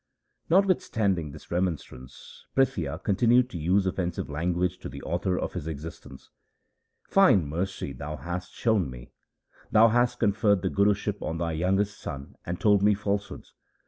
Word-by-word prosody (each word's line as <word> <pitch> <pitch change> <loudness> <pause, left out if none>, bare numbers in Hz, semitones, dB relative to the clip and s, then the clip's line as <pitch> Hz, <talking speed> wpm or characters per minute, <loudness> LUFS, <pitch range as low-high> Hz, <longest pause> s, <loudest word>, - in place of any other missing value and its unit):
1 170 - +4
Notwithstanding 100 - 0
this 75 +1 -13
remonstrance 80 -8 -4
Prithia 90 - +1
con 100 - +1
tinued 120 +3 +4
to 85 - -6
use 95 +5 +2
offensive 90 -4 -2
language 90 +4 -1
to - - -7
the - - -9
author 90 +2 -1
of - - -3
his 85 -4 -5
existence. 75 -3 -8 0.4
' - - -52
Fine 185 - +5
mercy 85 -1 -3
thou 75 +4 -6
hast 90 +4 -5
shown 110 - +1
me! - - -11 0.6
Thou 115 +1 +6
hast 120 +1 +2
conferred 100 -1 +2
the 95 - 0
Guruship 100 0 +1
on 80 - -3
thy 85 0 -1
youngest 95 +5 0
son 70 0 -7
and 90 +1 -3
told 105 -2 +4
me 105 0 +4
falsehoods. 100 0 -4
95 Hz, 160 wpm, -27 LUFS, 80-105 Hz, 0.6 s, Thou